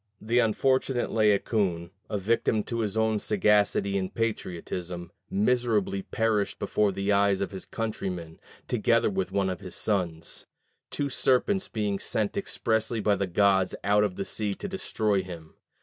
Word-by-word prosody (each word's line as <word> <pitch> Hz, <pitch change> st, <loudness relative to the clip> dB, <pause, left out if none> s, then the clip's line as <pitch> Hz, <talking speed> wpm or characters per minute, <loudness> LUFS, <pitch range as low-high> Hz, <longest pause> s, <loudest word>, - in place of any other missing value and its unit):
The 115 Hz, +3 st, +1 dB
unfortunate 130 Hz, +2 st, +1 dB
Laocoon, 100 Hz, -5 st, +1 dB, 0.2 s
a 105 Hz, -, -1 dB
victim 110 Hz, +1 st, +1 dB
to 115 Hz, +2 st, -4 dB
his 110 Hz, -1 st, -1 dB
own 110 Hz, -1 st, +2 dB
sagacity 100 Hz, -1 st, +2 dB
and 95 Hz, -1 st, -3 dB
patriotism, 90 Hz, -5 st, -4 dB, 0.2 s
miserably 105 Hz, -2 st, +1 dB
perished 110 Hz, -1 st, 0 dB
before 105 Hz, -1 st, +1 dB
the 100 Hz, +2 st, -1 dB
eyes 100 Hz, -1 st, +3 dB
of 100 Hz, -, -2 dB
his 95 Hz, -1 st, -7 dB
countrymen, 95 Hz, -7 st, -4 dB, 0.3 s
together -, -, +2 dB
with 95 Hz, -1 st, -2 dB
one 100 Hz, 0 st, +1 dB
of 95 Hz, -1 st, -3 dB
his 95 Hz, -3 st, -8 dB
sons: 90 Hz, -6 st, -2 dB, 0.4 s
two 140 Hz, -1 st, -2 dB
serpents 160 Hz, +11 st, +2 dB
being 105 Hz, -3 st, -2 dB
sent 105 Hz, -2 st, -1 dB
expressly 115 Hz, -, -1 dB
by 105 Hz, -1 st, +2 dB
the 100 Hz, -, -1 dB
gods 95 Hz, 0 st, +3 dB
out 105 Hz, +1 st, +4 dB
of 100 Hz, -3 st, -1 dB
the 100 Hz, -, -3 dB
sea 105 Hz, -2 st, -2 dB
to -, -, -6 dB
destroy 110 Hz, -, 0 dB
him. 85 Hz, -4 st, -10 dB
105 Hz, 150 wpm, -27 LUFS, 95-110 Hz, 0.4 s, out